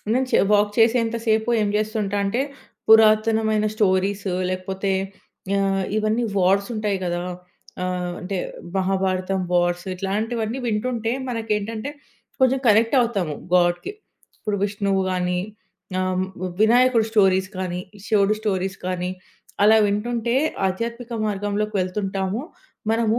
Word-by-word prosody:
నేను 260 +1 +1
చే - - +4
వాక్ 205 0 +4
చేసేంత 230 0 +3
సేపు 220 +1 +2
ఏం 210 - +1
జేస్తుంటా 210 -2 -1
అంటే, 230 +6 0 0.5
పురాతనమైన 220 0 +5
స్టోరీస్ 200 0 +1 0.2
లేకపోతే, 190 +1 -2 0.7
ఆహ్, 195 -1 +1
ఇవన్నీ 215 +2 +1
వార్స్ 195 +3 +3
ఉంటాయి 210 -3 -1
గదా! 175 0 -1 0.6
ఆహ్, 180 -1 -2
అంటే, 190 +1 -3 0.4
'మహాభారతం' 190 0 0
వార్స్ 175 0 +1
ఇట్లాంటివన్నీ 220 +5 -2
వింటుంటే 230 +1 -1 0.2
మనకేంటంటే, 225 +2 -2 0.5
కొంచెం 260 +1 +4
కనెక్ట్ 225 +4 +4
అవుతాము 200 -11 -1 0.2
గాడ్‍కి. 175 - +2 0.5
ఇప్పుడు 210 -1 -2
విష్ణువు 200 -1 0
గాని, 180 -1 0 0.6
ఆహ్, 185 0 0 0.4
వినాయకుడి 240 0 +4
స్టోరీస్ 190 -3 +3
కానీ, 180 -1 -3 0.3
శివుడి 210 0 +3
స్టోరీస్ 195 -2 -1
కానీ, 180 0 -2 0.5
అలా 220 +2 +7
వింటుంటే 235 +3 -1 0.3
ఆధ్యాత్మిక 235 +5 -4
మార్గంలోకి 205 +1 -2
వెళ్తుంటాము. 195 +3 -2 0.5
మనము 225 0 +2
205 Hz, 110 wpm, -23 LUFS, 190-225 Hz, 0.7 s, అలా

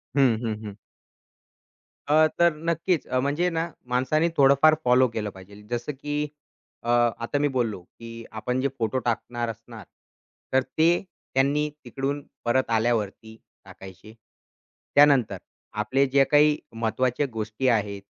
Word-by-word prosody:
हं, 130 -5 +4
हं, 110 -2 -1
हं. 105 -1 -8 1.3
अ, 155 +2 +5
तर 170 -1 +5 0.2
नक्कीच, 170 -1 0
अ, 130 - 0
म्हणजे 150 +6 0
ना, 165 0 -2 0.2
माणसांनी 155 +6 +2
थोडंफार 140 +3 +6
फॉलो 125 +1 +5
केलं 105 -2 -3
पाहिजे. 100 +2 -14
जसं 120 +4 -2
की 150 0 -2 0.6
अ, 120 - -4 0.3
आता 115 +5 -2
मी 145 - +2
बोललो, 115 -7 -1
की 115 +5 -11 0.2
आपण 125 +3 -2
जे 140 - +2
फोटो 115 +2 0
टाकणार 120 0 -2
असणार, 115 -1 -10 0.7
तर 130 - +5 0.2
ते 160 +1 +5 0.4
त्यांनी 145 +3 +2 0.2
तिकडून 140 +1 -3 0.2
परत 130 +2 +1
आल्यावरती 110 -1 -1 0.3
टाकायचे. 95 +3 -13 0.8
त्यानंतर 135 -9 +5 0.5
आपले 135 +6 +2
जे 135 +1 +4
काही 150 0 +5 0.2
महत्वाच्या 120 +4 0
गोष्टी 110 +3 -3
आहेत 105 -4 0
125 Hz, 130 wpm, -25 LUFS, 110-145 Hz, 1.3 s, थोडंफार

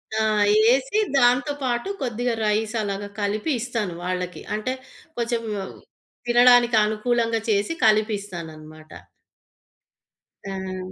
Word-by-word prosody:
ఆ! 220 - +1 0.4
యెసి 270 - +3 0.2
దాంతో 250 +3 +3
పాటు 245 +7 -1
కొద్దిగా 245 -1 -1
రైస్ 215 +2 0
అలాగా 200 0 -4
కలిపి 210 +9 -1
ఇస్తాను 225 -6 -3
వాళ్ళకి. 180 0 -4
అంటే 215 +5 -2 0.4
కొంచెం 235 0 -1 0.9
తినడానికి 240 -1 +5
అనుకూలంగా 230 +1 0
చేసి 205 +9 +1
కలిపి 215 0 +3
ఇస్తానన్నమాట. 155 -4 -10 1.6
హ్మ్. 185 -1 -5
220 Hz, 100 wpm, -23 LUFS, 195-245 Hz, 1.6 s, తినడానికి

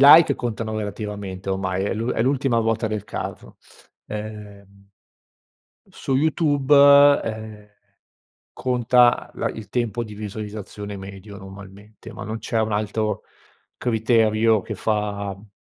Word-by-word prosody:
like 145 +1 +8
contano 115 -2 -4
relativamente 100 -2 -5
ormai, 95 0 -1
è - - -1
l'u 115 +3 -2
è 110 - 0
l'ultima 135 -2 +1
ruota 115 0 0
del 105 -1 -3
carro. - - -7 0.5
Ehm 100 -2 -9 1.0
su 135 - -2
YouTube, 145 -2 +1 0.5
ehm, 110 -2 -7 0.8
conta 125 -1 +3
la - - -1
il 105 -3 -8
tempo 120 0 -1
di 105 -2 -10
visualizzazione 105 -1 -7
medio 100 +1 -10
normalmente, 100 +2 -12
ma - - -8
non 110 +2 -5
c'è 115 0 -1
un 110 0 0
altro 105 0 -1 0.6
criterio 110 -2 +2
che - - -6
fa 100 -2 -2
m 105 +2 -17
110 Hz, 125 wpm, -23 LUFS, 100-115 Hz, 1.0 s, like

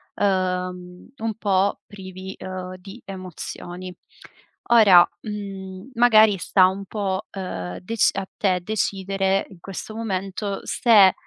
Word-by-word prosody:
uhm, 180 -2 -1
un 225 0 -2
po' 200 -2 +1
privi, 190 -1 -9
uhm, 185 0 -6
di 195 +6 -12
emozioni. 185 -1 -7 0.8
Ora, 200 -7 +8 0.2
mhmm, 195 -1 -7
magari 220 -4 +6
sta 185 +1 +4
un 195 +1 -4
po', 195 0 -3
uhm, 90 - -5
dec 225 +4 +2
a - - -2
te 185 -3 +2
decidere 195 -1 0
in 185 - -15
questo 195 +4 -7
momento 200 -2 -3
se, 205 -6 +5
190 Hz, 115 wpm, -23 LUFS, 185-205 Hz, 0.8 s, Ora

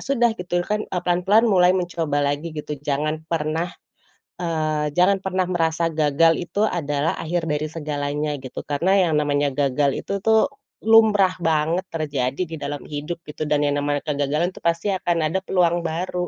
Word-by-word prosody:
sudah 240 -4 +2
gitu, 175 -2 -2
kan, 210 +2 -1
eee, 180 - -2
pelan-pelan 180 +5 +3
mulai 180 -4 +5
mencoba 165 -5 -1
lagi 145 +4 -1
gitu, 150 -1 -5
jangan 150 +2 -1
pernah, 160 +1 -1 0.7
eee, 155 -3 -1
jangan 190 +2 +4
pernah 190 -1 0
merasa 165 -2 0
gagal 155 +1 +3
itu 200 +4 0
adalah 150 -5 -1
akhir 170 0 -2
dari 150 -1 -1
segalanya 150 -1 -3
gitu. 130 -1 -7
Karena 170 +7 +1
yang - - 0
namanya 145 -1 0
gagal 140 0 +1
itu, 200 - -3
tuh, 220 +4 +4 0.3
lumrah 215 -4 +5
banget 165 +2 +1
terjadi 145 -3 -2
di 165 -2 -6
dalam 145 0 -5
hidup 150 +3 -5
gitu, 150 0 -5
dan 150 0 +2
yang 145 0 +1
namanya 145 0 -1
kegagalan, 150 +3 0
tuh, - - -13
pasti 170 +4 0
akan 175 -2 0
ada 190 - +1
peluang 175 -2 +1
baru. 180 +2 -2
165 Hz, 165 wpm, -22 LUFS, 145-180 Hz, 0.7 s, mulai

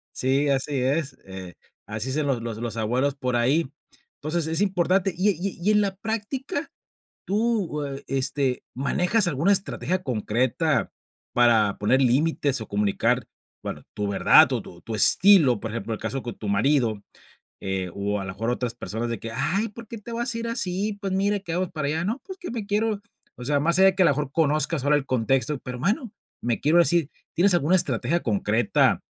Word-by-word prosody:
sí, 135 +3 +1
así 140 +1 0
es, 135 +2 -1
eh, 95 -2 -9 0.3
así 110 +4 -4
dicen 145 +2 -1
los 135 -4 0
los 115 -2 -5
los 115 -1 -5
abuelos 125 +6 0
por 125 -3 -2
ahí. 130 +5 +1 0.5
Entonces, 155 +2 -1
es 165 +4 0
importante 190 0 +2
y 185 +5 +2
y 190 +2 -4
y 210 +4 +2
en 210 0 +4
la 195 -1 -1
práctica, 225 +8 -4 0.5
¿tú, 205 -7 0
e 135 0 -6
este 135 -1 -1
manejas 180 - +2
alguna 160 +6 +1
estrategia 185 -1 -1
concreta 130 +4 0 0.4
para 115 -4 +3
poner 130 +6 +2
límites 140 +1 +2
o 110 - -7
comunicar, 100 -1 0 0.4
bueno, - - -6
tu 105 -1 -2
verdad 100 - +6
o - - -1
tu 85 - -13
tu 110 - -5
estilo?, 150 - +5
por 115 - -5
ejemplo, 115 0 -4
el 110 - -5
caso 135 -1 -3
con 120 - -6
tu 105 - -6
marido, 110 0 +1 0.6
eh, 95 -1 -3
o 100 +1 -2
a - - -5
lo 95 - -5
mejor 115 +4 -4
otras 125 -1 -2
personas 115 +2 -4
de 115 - -3
que, 115 0 -6
ay, 200 - 0
¿por 225 +1 -12
qué 230 - -7
te 225 +3 -11
vas 235 +1 -1
a - - -3
ir 230 0 -4
así?, 200 -2 -2
pues, 195 -1 -2
mire, 200 +1 0
que 170 - -6
vamos 185 0 -1
para 155 -3 -2
allá, 160 +3 -1
no, 230 +6 -1
pues 380 -1 -9
que 360 - -7
me 230 -3 -4
quiero, 210 0 0 0.4
o 125 - -8
sea, 145 0 +1
más 170 +4 +3
allá 190 0 +7
de 190 - +1
que 190 - +4
a 175 - +5
lo - - +5
mejor 140 -1 -3
conozcas 155 -2 +1
ahora 145 +1 +4
el 145 - -1
contexto, 130 +3 0
pero 125 0 -7
bueno, 210 - -1 0.3
me 120 -1 -1
quiero 155 +4 +3
ir 175 - +8
así, 165 -1 +2 0.2
¿tienes 190 +3 +4
alguna 175 +2 +3
estrategia 170 -1 +1
concreta 110 +2 +2
145 Hz, 200 wpm, -24 LUFS, 120-190 Hz, 0.6 s, ir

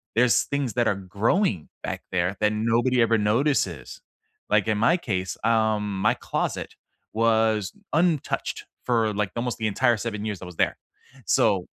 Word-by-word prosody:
there's 120 +1 +4
things 140 -5 -2
that 120 +2 +1
are 105 - +2
growing 100 - 0
back - - -4
there 90 +1 0
that 105 0 +3
nobody 115 +3 +2
ever 115 0 +3
notices. 115 +8 0 0.5
Like - - +2
in 110 -1 +1
my 125 +11 +3
case, 95 - -3
um, 110 -3 +1
my - - +4
closet - - -3 0.4
was 110 -3 +2 0.2
untouched 160 -2 0 0.2
for 115 -3 +1
like 100 -2 -1
almost 120 +1 -2
the 110 - -1
entire 120 +3 +2
7 105 -1 -4
years 105 -4 -4
I - - -7
was 90 -1 -10
there, - - +1 0.5
so - - +2
110 Hz, 160 wpm, -25 LUFS, 105-120 Hz, 0.5 s, there's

